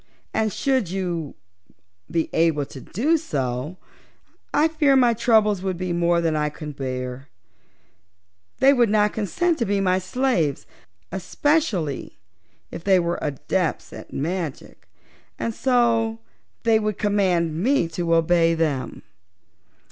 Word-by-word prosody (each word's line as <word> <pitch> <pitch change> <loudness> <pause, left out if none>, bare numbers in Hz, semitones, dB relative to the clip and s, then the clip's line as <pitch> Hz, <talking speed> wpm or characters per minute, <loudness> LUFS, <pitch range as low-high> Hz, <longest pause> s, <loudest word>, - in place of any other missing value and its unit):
And, 220 -1 +1
should 260 - 0
you 175 -5 -3 0.7
be 165 -1 0
able 160 -3 +2
to 135 - -11
do 290 - +1
so, 135 - -3 0.7
I 300 +2 +4
fear 305 -4 +3
my 245 -3 +5
troubles 215 -4 +3
would 190 -2 -2
be 180 0 -2
more 170 0 +2
than 165 -2 0
I 150 0 0
could 150 -1 -8
bear. 130 0 -5 1.3
They 270 +2 +6
would 240 -4 +3
not 210 0 +2
consent 315 - 0
to 235 - +1
be 200 -1 0
my 185 -1 +2
slaves 185 - 0 0.5
especially 190 - -1 0.5
if - - -7
they 190 -2 +4
were 170 0 -1
Adepts 155 +4 -2
at - - -10
Magic 165 0 -4 0.5
and 230 - -2
so 230 -3 +2 0.5
they 225 -1 +4
would 215 -2 -2
command 180 -6 +1
me 255 -5 +2
to 170 0 0
obey 165 0 +3
them. 155 -5 -2
185 Hz, 130 wpm, -23 LUFS, 160-225 Hz, 1.3 s, They